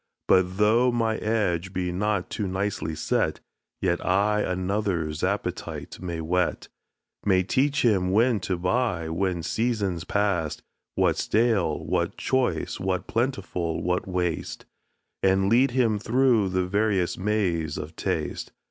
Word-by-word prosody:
But, 95 0 +3
though 115 +4 +4
my 115 -2 0
edge 95 -5 -1
be 90 -1 -1
not 100 +1 -1
too 105 - -2
nicely 95 -4 -2
set, - - 0 0.4
Yet 85 -2 +1
I 105 +3 +2
another's 90 -5 -1
appetite - - -3
may 85 -3 -4
whet; 90 +3 -1 0.5
May 95 -2 +3
teach 140 +9 +1
him 95 -5 +3
when 115 +2 +3
to 90 -1 -2
buy, 90 -3 0
when 90 0 -1
season's 100 -4 -1
pass'd, 95 -6 -1 0.3
What's - - +1
stale, 105 -8 +1
what - - -1
choice, 130 -1 0
what 95 -1 -1
plentiful, 100 -9 -2
what 90 +4 -1
waste, 90 -3 -2 0.6
And 95 0 +3
lead 125 +5 +4
him 120 -4 +1
through 115 -2 +3
the 90 0 0
various 100 -2 +1
maze 90 -7 0
of 80 +2 -7
taste. - - -3
95 Hz, 130 wpm, -26 LUFS, 90-110 Hz, 0.6 s, though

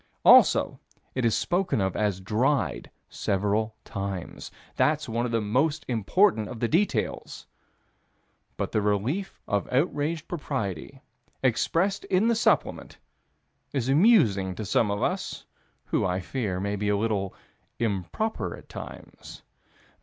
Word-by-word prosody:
Also - - +6 0.3
it 130 - -2
is 115 -2 +2
spoken 180 - 0
of 95 -2 0
as 105 -3 0
"dried" 110 - 0 0.2
several 105 +3 -1
times. 100 -4 -5 0.3
That's 155 0 +1
one 120 +1 -1
of - - -5
the 115 -1 +1
most 135 +9 0
important 120 - +2
of 115 - -7
the 120 - +1
details. 180 - -1 1.1
But - - -2
the 110 - +1
relief 110 - -1
of 100 -2 -1
outraged 150 +3 0
propriety, 135 - -4 0.4
expressed 165 - +1
in 195 +5 +2
the 235 - +3
Supplement, 225 - 0 0.8
is 130 -3 -1
amusing 130 - +4
to 110 - -5
some 105 +1 +2
of 100 0 -1
us, - - -2 0.4
who, - - 0
I 90 0 0
fear, 95 0 -3
may 100 +2 -2
be 105 +1 -1
a 105 - +2
little 100 -3 -1 0.4
improper 115 - -2
at - - -16
times. - - -10
115 Hz, 130 wpm, -26 LUFS, 100-150 Hz, 1.1 s, Also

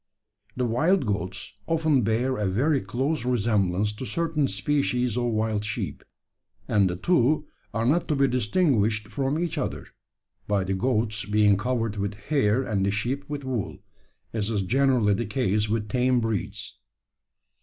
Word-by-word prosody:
The 125 - +1
wild 155 +9 +2
goats 100 -2 -3
often 160 -4 +2
bear 120 +4 +1
a 105 -3 -1
very 135 +10 +1
close 135 +2 -1
resemblance 105 -5 +1
to 115 +5 -6
certain 160 -4 0
species 125 +1 0
of 125 -1 0
wild 110 -2 0
sheep; 105 - -4 0.6
and 100 -3 +3
the 90 - -2
two 155 - +2 0.3
are 115 +1 -1
not 155 +8 +2
to 150 - +1
be 135 0 +3
distinguished 115 - +1
from 135 +6 -1
each 170 -1 -2
other, - - -3 0.6
by 100 -2 +1
the 95 +1 -2
goats 110 0 0
being 105 -1 +4
covered 115 0 -1
with 100 +1 -2
hair 110 +1 +1
and 105 -6 -1
the 100 - +2
sheep 120 +8 -2
with 145 -1 -4
wool 125 -7 -3 0.6
as 110 -2 -1
is 105 -3 0
generally 125 -1 +3
the 105 +2 -2
case 105 -3 0
with 110 -1 -1
tame 125 +3 +2
breeds. 115 -4 -3
115 Hz, 155 wpm, -26 LUFS, 105-135 Hz, 0.6 s, being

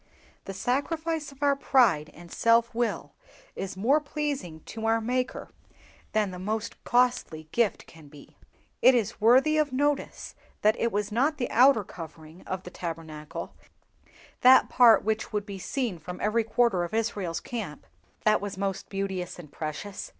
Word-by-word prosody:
The 195 - -6
sacrifice 305 - -2
of 275 +1 -9
our 285 -1 +4
pride 230 - +3
and 170 +1 -13
self 230 0 +3
will 235 0 -2 0.4
is 190 0 -5
more 260 +10 +3
pleasing 285 - -4
to 225 +6 -5
our 225 0 +3
Maker 250 +3 -2 0.6
than 210 -3 +1
the 180 - -8
most 215 +3 -4
costly 240 -11 +1
gifts 235 -5 0
can 160 -2 -16
be. 145 -1 -16 0.5
It 260 - +7
is 230 -2 -1
worthy 265 +8 +5
of 300 -2 +1
notice 285 +2 -1 0.3
that 215 +1 +5
it 235 - +1
was 205 +1 -2
not 280 +8 +1
the 245 - -3
outer 255 -3 +5
covering 160 -1 -11
of 185 0 -4
the 180 - -9
Tabernacle, 160 -4 -7 0.9
that 255 +1 +7
part 240 -3 +6
which 220 +1 -2
would 210 -2 -2
be 200 -2 -7
seen 230 - -3
from 180 +3 -8
every 220 +2 +1
quarter 225 -5 +2
of 175 +5 -4
Israel's 205 -7 -1
camp, 200 -11 -6 0.4
that 215 -1 +4
was 205 -1 -5
most 195 -1 -3
beauteous 190 -2 -4
and 155 -5 -12
precious. 160 +7 -6
215 Hz, 160 wpm, -27 LUFS, 180-250 Hz, 0.9 s, It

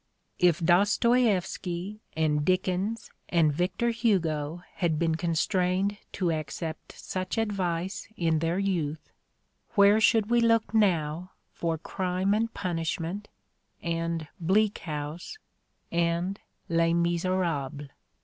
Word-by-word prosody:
If 175 -3 +4
Dostoievsky 200 0 +2 0.2
and 150 -2 +2
Dickens 185 +5 0 0.2
and 160 -4 +3
Victor 185 +9 0
Hugo 175 -8 0
had 165 -3 +1
been 165 0 +1
constrained 180 +4 0 0.2
to 180 -3 0
accept 155 +1 -5
such 185 +3 -4
advice 190 -2 -1
in 165 -2 +2
their 165 +2 0
youth, 170 -6 -2 0.6
where 200 +1 +6
should 220 0 +3
we 240 0 +4
look 230 -1 +2
now 180 -4 +1 0.2
for 165 -1 -1
"Crime 185 +3 -1
and 225 +2 0
Punishment" 175 +2 -3 0.6
and 165 -1 -2
"Bleak 200 +5 +2
House" 155 - -5 0.5
and 170 +3 0 0.3
"Les 165 0 +2
Miserables"? 170 -5 -1
175 Hz, 105 wpm, -28 LUFS, 165-200 Hz, 0.6 s, where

